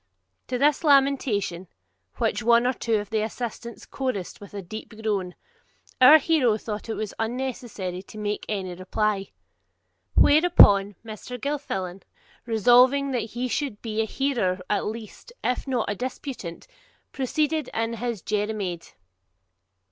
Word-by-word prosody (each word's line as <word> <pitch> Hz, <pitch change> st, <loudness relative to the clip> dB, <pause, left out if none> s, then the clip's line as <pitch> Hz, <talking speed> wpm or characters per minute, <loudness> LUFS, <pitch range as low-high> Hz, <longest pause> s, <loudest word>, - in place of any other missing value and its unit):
To 250 Hz, -, -2 dB
this 290 Hz, +4 st, +2 dB
lamentation, 265 Hz, -, +2 dB, 0.5 s
which -, -, 0 dB
one 235 Hz, +1 st, +4 dB
or 255 Hz, -, +2 dB
two 230 Hz, -2 st, -1 dB
of 205 Hz, -1 st, -3 dB
the 220 Hz, -1 st, +1 dB
assistants 235 Hz, +1 st, -5 dB
chorussed 255 Hz, -11 st, -4 dB
with 205 Hz, 0 st, -11 dB
a 200 Hz, -, -5 dB
deep 215 Hz, +5 st, -8 dB
groan, 200 Hz, -5 st, -2 dB, 0.7 s
our 290 Hz, +5 st, +10 dB
hero 275 Hz, -8 st, +2 dB
thought 215 Hz, +1 st, -6 dB
it 215 Hz, -2 st, -3 dB
unnecessary 225 Hz, -6 st, -3 dB
to 200 Hz, -, -13 dB
make 210 Hz, 0 st, -3 dB
any 190 Hz, -4 st, -3 dB
reply. 195 Hz, +2 st, -1 dB, 0.9 s
Whereupon 205 Hz, -, +6 dB
Mr. 225 Hz, +3 st, -7 dB
Gilfillan, 195 Hz, -10 st, -3 dB, 0.5 s
resolving 250 Hz, +5 st, +4 dB
that 230 Hz, -4 st, -2 dB
he 250 Hz, +1 st, 0 dB
should 260 Hz, -4 st, -2 dB
be 220 Hz, -1 st, -1 dB
a -, -, 0 dB
hearer 220 Hz, -8 st, -1 dB
at 205 Hz, -, +1 dB
least, 225 Hz, -, -8 dB
if 250 Hz, +2 st, -1 dB
not 250 Hz, -4 st, 0 dB
a 205 Hz, -, 0 dB
disputant, 250 Hz, -, -6 dB, 0.5 s
proceeded 300 Hz, +2 st, -1 dB
in 225 Hz, +1 st, -1 dB
his 230 Hz, -4 st, -4 dB
Jeremiade. 205 Hz, -5 st, -3 dB
225 Hz, 135 wpm, -25 LUFS, 205-255 Hz, 0.9 s, our